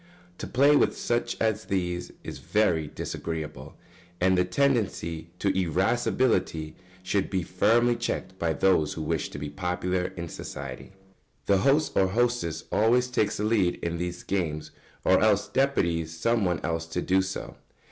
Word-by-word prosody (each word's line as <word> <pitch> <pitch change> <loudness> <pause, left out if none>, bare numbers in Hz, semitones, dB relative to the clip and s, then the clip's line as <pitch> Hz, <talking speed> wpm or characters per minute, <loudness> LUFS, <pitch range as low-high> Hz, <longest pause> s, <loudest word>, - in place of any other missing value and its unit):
To - - -5
play 140 +4 +4
with - - +3
such 120 0 -1
as 110 -1 0
these 90 -2 -2
is - - -7
very 85 -8 +1
disagreeable, 80 0 -6 0.4
and 95 +1 +3
the 90 - +3
tendency 90 - 0
to 100 - 0
irascibility 95 -2 +1 0.3
should 95 +1 0
be 95 -3 -1
firmly 115 +7 +3
checked 95 -5 -4
by 85 -1 +1
those 80 -1 +2
who 80 - -5
wish - - -1
to - - -8
be 75 0 -5
popular 90 0 -1
in 85 0 -4
society. 70 +1 -8 0.5
The 100 -1 +3
host 140 +8 +2
or 95 - +4
hostess 110 -6 0
always 125 +3 +3
takes 110 -4 0
the 105 - -2
lead 105 -5 +2
in 85 0 -2
these 90 0 -4
games, 75 -5 -2 0.3
or - - +4
else 105 -2 +3
deputes 85 - +1
some 110 +6 +1
one 90 -3 0
else 80 0 -2
to 85 +2 -3
do 95 +1 +3
so. 95 0 -5
95 Hz, 155 wpm, -27 LUFS, 85-110 Hz, 0.5 s, play